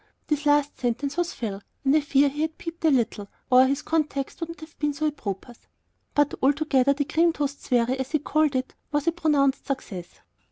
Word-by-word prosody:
This 300 -1 -1
last 290 0 +2
sentence 255 +4 -1
was 350 0 -1
Phil's, 205 -4 -4 0.2
and 270 +2 +4
I - - +6
fear 285 0 +3
he 290 +2 -3
had 320 0 -2
peeped 335 0 -8
a - - +6
little, 235 -6 +1 0.2
or 255 +1 +7
his 275 +1 -1
context 300 -4 -1
would 330 -1 -4
not 335 0 -9
have 315 +1 -12
been 295 -1 0
so 310 +2 -2
apropos; 240 -6 -4 0.6
but 290 -1 +3
altogether 280 -1 +3
the 285 0 -1
"cream 330 +3 +3
toast 285 -2 -2
swarry," 250 +1 +1
as 265 0 -3
he 305 - +2
called 305 -1 +1
it, 260 0 -2 0.2
was 295 -1 0
a 335 - +3
pronounced 295 -5 +1
success. 200 -10 -4
285 Hz, 205 wpm, -25 LUFS, 260-310 Hz, 0.6 s, or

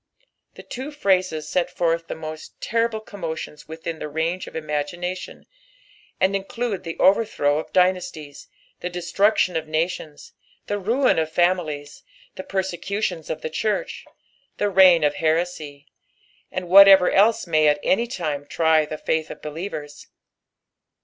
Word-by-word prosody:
The - - -11
two 260 +4 -6
phrases 185 - 0
set 180 +2 0
forth 165 -1 -1
the - - -5
most 155 0 -9
terrible 230 -1 -1
commotions 165 -8 -7
within 160 0 -6
the - - -4
range 165 +4 -2
of - - -11
imagination, 160 +4 -4 0.7
and 190 +1 +2
include 200 +1 -3
the 165 -2 -5
overthiow 190 -8 +2
of - - -8
dynastiea, 180 -5 -1 0.3
the 180 - -4
destruction 180 +2 +1
of 160 -1 -2
nations, 155 -1 -3 0.3
the 205 - -2
ruin 235 +3 +2
of 160 0 -2
families, 160 -5 -1 0.3
the - - -7
persecutions 190 -2 -3
of - - -4
the - - -2
church, 210 +6 -2 0.5
the 205 0 0
reign 185 -4 +6
of 145 0 +1
heresy, 155 -3 -1 0.7
and 185 -1 -4
whatever 195 0 +8
else 215 +4 +3
may 155 -3 +3
at 145 0 +3
any 230 +5 +2
time 150 - -4
try 160 -1 +3
the 155 - -5
faith 160 0 -1
of - - -8
believers. 150 -2 -7
175 Hz, 140 wpm, -23 LUFS, 155-190 Hz, 0.7 s, whatever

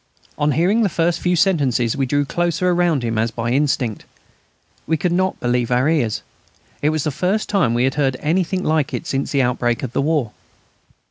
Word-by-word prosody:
On 145 0 +1
hearing 190 +8 +2
the 210 - +2
first 170 +1 0
few 180 0 +1
sentences 140 - +1
we 135 -2 -1
drew 145 +2 +1
closer 175 +3 0
around 175 -6 +1
him 115 -1 -1
as 115 +1 +1
by 115 +1 -3
instinct. 130 -5 0 0.8
We 160 - +1
could 175 +3 -1
not 185 +2 0
believe 120 -1 0
our 125 +3 +2
ears. 140 -9 0 0.6
It 150 - +2
was 155 -2 -1
the 150 - -1
first 185 +9 -1
time 150 - +1
we 120 - +2
had 130 0 +1
heard 135 -3 0
anything 185 +4 0
like 155 -3 0
it - - -5
since 135 0 -2
the 140 -2 +2
outbreak 120 0 0
of 130 -2 -4
the - - +1
war. 145 -6 0
145 Hz, 200 wpm, -20 LUFS, 125-175 Hz, 0.8 s, hearing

